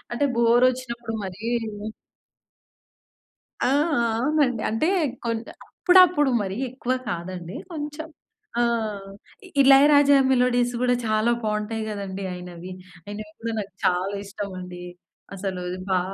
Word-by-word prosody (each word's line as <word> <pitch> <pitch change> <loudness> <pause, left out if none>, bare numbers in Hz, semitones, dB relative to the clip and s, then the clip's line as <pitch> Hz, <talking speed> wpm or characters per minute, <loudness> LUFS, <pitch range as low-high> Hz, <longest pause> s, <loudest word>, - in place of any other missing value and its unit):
అంటే 240 +4 0
బోర్ 235 +1 +4
ఒచ్చినప్పుడు 235 -3 -6
మరీ 190 -1 -7 2.3
ఆ! - - +3
ఆ! - - +3 0.5
అవునండి. 270 -4 +1
అంటే 225 +8 0 0.4
కొంచ్ 230 0 -2 0.2
అప్పుడప్పుడు 360 -6 +5
మరి 195 0 -4
ఎక్కువ 255 0 -3 0.2
కాదండి 175 0 -5 0.2
కొంచెం 300 0 -5 0.5
ఆహ్, 220 -4 -1 0.5
ఇళయరాజా 285 +1 +7
మెలోడీస్ 245 -1 +2
కూడా 250 0 +3
చాలా 215 +2 +2
బాగుంటాయి 215 +1 -2
కదండీ! 195 -2 -5
ఆయినవి. 180 0 -8 0.3
అయినవి 210 +1 -7
కూడా 230 0 -3
నాకు 200 -2 -8
చాలా 185 +3 +1
ఇష్టం 200 0 -6
అండి. 180 -1 -8 0.5
అసలు 190 -1 -4 0.3
బా 185 -1 +3
225 Hz, 110 wpm, -24 LUFS, 195-255 Hz, 2.3 s, ఇళయరాజా